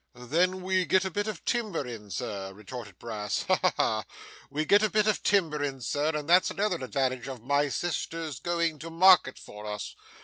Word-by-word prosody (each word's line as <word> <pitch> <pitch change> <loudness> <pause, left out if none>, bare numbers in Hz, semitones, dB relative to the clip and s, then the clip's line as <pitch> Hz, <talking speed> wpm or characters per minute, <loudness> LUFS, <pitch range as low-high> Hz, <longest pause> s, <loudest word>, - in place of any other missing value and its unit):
'Then 175 +10 0
we 185 0 +2
get 190 +4 +2
a 190 - -2
bit 205 +4 -2
of 210 -6 -6
timber 215 - -1
in, 110 -4 -8
Sir,' 95 +2 -4
retorted 105 0 -9
Brass. 105 -3 -3
'Ha, - - +2
ha, - - +3
ha! - - +1 0.4
We 155 +2 -2
get 205 +5 +5
a 215 - +2
bit 215 0 +2
of 215 -1 +1
timber 160 -7 +2
in, 135 -2 -3
Sir, 145 +6 -1
and 150 -1 -5
that's 180 +2 +5
another 200 -3 0
advantage 130 -1 -2
of 130 -4 -7
my 140 +2 +2
sister's 165 -3 -3
going 170 -3 -1
to 165 +3 -7
market 175 -5 +5
for 105 +1 -10
us. 105 0 -5
155 Hz, 200 wpm, -28 LUFS, 125-185 Hz, 0.4 s, get